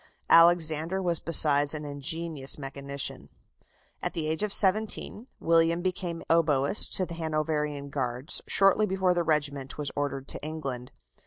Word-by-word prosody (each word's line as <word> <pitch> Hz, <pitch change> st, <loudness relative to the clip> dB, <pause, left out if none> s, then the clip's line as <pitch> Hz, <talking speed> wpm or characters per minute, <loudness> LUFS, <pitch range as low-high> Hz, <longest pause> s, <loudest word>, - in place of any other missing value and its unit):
Alexander 165 Hz, +1 st, +4 dB
was 175 Hz, -3 st, 0 dB
besides 145 Hz, -2 st, +4 dB
an 150 Hz, -1 st, -7 dB
ingenious 145 Hz, 0 st, -1 dB
mechanician. 140 Hz, 0 st, -5 dB, 0.7 s
At -, -, -3 dB
the 160 Hz, -, -3 dB
age 160 Hz, +3 st, -3 dB
of 210 Hz, -1 st, -2 dB
seventeen, 215 Hz, +3 st, +1 dB
William 165 Hz, +1 st, +1 dB
became 180 Hz, -2 st, -4 dB
oboist 155 Hz, 0 st, +4 dB
to 185 Hz, -, 0 dB
the 170 Hz, -, -9 dB
Hanoverian 155 Hz, -3 st, -3 dB
Guards, 130 Hz, +1 st, -1 dB
shortly 195 Hz, +2 st, +2 dB
before 190 Hz, -2 st, 0 dB
the 175 Hz, -, -1 dB
regiment 145 Hz, -4 st, -2 dB
was 145 Hz, -2 st, -3 dB
ordered 140 Hz, -1 st, -4 dB
to -, -, -3 dB
England. 135 Hz, -6 st, -6 dB
155 Hz, 140 wpm, -26 LUFS, 145-170 Hz, 0.7 s, Alexander